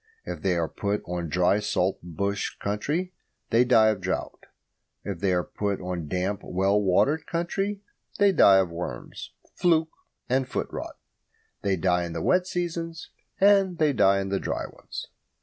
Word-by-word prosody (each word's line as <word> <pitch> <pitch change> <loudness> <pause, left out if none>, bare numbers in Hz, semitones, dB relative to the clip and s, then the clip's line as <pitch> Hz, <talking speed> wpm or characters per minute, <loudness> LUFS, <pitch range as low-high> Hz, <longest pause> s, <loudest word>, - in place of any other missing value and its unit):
If - - -6
they 95 -2 +1
are 85 -1 0
put 105 +3 -2
on 85 -2 -4
dry 90 +5 +3
salt 95 -2 0
bush 100 +4 -3
country 150 - -2 0.4
they 115 +1 +5
die 115 -3 +5
of 105 -3 -1
drought. 95 +1 -4 0.6
If 100 -4 -5
they 95 -1 +1
are 90 -1 +1
put 100 -2 -3
on 90 -3 -4
damp, 95 +5 -2
well 95 +3 +1
watered 120 - +2
country 195 +4 -2 0.3
they 200 -1 +5
die 100 - +6
of 95 -3 +2
worms, 85 -8 -6 0.2
fluke, 165 -3 +2 0.4
and 130 +1 +1
foot - - -2
rot. - - -6 0.6
They 100 -1 +1
die 90 0 +1
in 85 - -6
the - - -3
wet 180 0 +2
seasons 165 -2 -4 0.3
and 195 -2 +4
they 155 -3 +3
die 100 -4 +4
in 95 - -4
the 100 0 0
dry - - -3
ones. - - -8
100 Hz, 165 wpm, -26 LUFS, -, 0.6 s, die